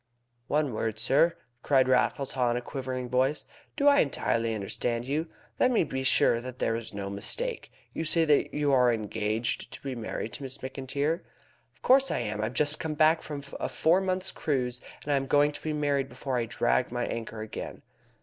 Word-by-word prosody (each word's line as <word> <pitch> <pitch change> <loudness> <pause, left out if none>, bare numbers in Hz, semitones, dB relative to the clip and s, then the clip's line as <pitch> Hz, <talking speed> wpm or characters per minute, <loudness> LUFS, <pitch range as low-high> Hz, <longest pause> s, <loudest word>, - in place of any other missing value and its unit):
"One 150 -3 +1
word, 110 0 -2
sir," 140 +9 +4 0.3
cried 135 -2 +3
Raffles 130 +1 +2
Haw 125 -2 +1
in 120 - +1
a - - -2
quivering 130 -1 -4
voice. 130 +4 +1 0.3
"Do 285 - +2
I 285 0 +7
entirely 115 -4 +1
understand 115 +3 -2
you? 150 +5 -1 0.3
Let 255 - +5
me 240 -7 +3
be 130 -3 -3
sure 120 -2 +4
that 125 0 -7
there 115 - 0
is 115 -1 -5
no 100 -1 -5
mistake. 465 - -4 0.2
You - - -2
say 165 +1 +2
that 150 -2 +3
you 145 -1 +1
are 125 -2 +5
engaged 110 +1 -2
to - - -8
be 135 -1 -3
married 115 -1 -5
to - - -4
Miss 135 0 -4
McIntyre?" 140 +4 -2 0.6
"Of - - -31
course 270 +1 +5
I - - 0
am. 105 -3 -2
I've 110 +3 -2
just 150 +3 +2
come 155 -1 -3
back 155 +2 +4
from 145 -2 -6 0.2
a - - -2
four 170 +4 +3
months' 185 0 -1
cruise, 125 -4 -1 0.2
and 145 - 0
I - - +4
am 135 0 -2
going 145 +2 +4
to 145 - -8
be 155 - -2
married 145 -2 0
before 135 -2 -4
I 120 -2 +1
drag 65 - +1
my 120 0 -1
anchor 115 -1 -5
again." 110 - -7
130 Hz, 205 wpm, -28 LUFS, 120-150 Hz, 0.6 s, I